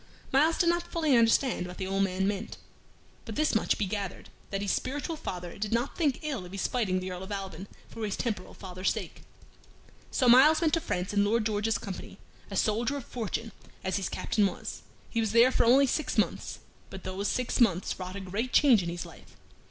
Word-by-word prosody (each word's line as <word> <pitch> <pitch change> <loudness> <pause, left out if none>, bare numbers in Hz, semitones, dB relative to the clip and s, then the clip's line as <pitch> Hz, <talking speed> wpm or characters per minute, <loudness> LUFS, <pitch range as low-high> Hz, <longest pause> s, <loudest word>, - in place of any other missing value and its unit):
Myles 310 +5 +4
did 345 - +2
not 345 0 +2
fully 315 -5 +2
understand 230 -3 +3
what 180 - -9
the 190 - -3
old 195 +1 0
man 190 0 +1
meant, 200 -1 -3 0.7
but - - -7
this 305 0 +2
much 220 - +2
he 210 - 0
gathered, 195 -1 -4 0.2
that 195 0 -2
his 200 - 0
spiritual 290 +5 -2
father 180 - -6
did 210 0 -2
not 235 +4 0
think 290 -7 +1
ill 280 -10 -3
of 180 - -10
his 195 - -2
fighting 205 -7 0
the 185 0 -5
Earl 180 0 -6
of 190 +2 -8
Alban 195 -2 -5 0.2
for 225 - -7
his 205 -2 -1
temporal 210 -7 -3
father's 185 -1 -3
sake. - - -6 0.9
So 255 - +1
Myles 270 +6 +7
went 325 -3 +1
to 330 - +3
France 185 - -2
in 200 0 +4
Lord 215 +2 +1
George's 215 0 +1
company, 195 -1 -7 0.3
a 200 - -6
soldier 230 +8 +1
of 270 - -7
fortune, 225 -1 -4 0.3
as 190 +1 0
his 190 -3 -2
Captain 210 -3 +1
was. - - -6 0.3
He 230 - 0
was 220 -2 0
there 235 +2 +6
for - - +2
only 265 +4 +6
six 300 +4 -1
months, - - 0 0.3
but 190 - -9
those 190 +2 -3
six 250 +4 0
months 190 -6 +2
wrought 185 0 -5
a 200 - -5
great 205 +7 -3
change 255 -9 +6
in 170 - -3
his 175 +1 -5
life. 170 - -15
210 Hz, 215 wpm, -29 LUFS, 190-255 Hz, 0.9 s, Myles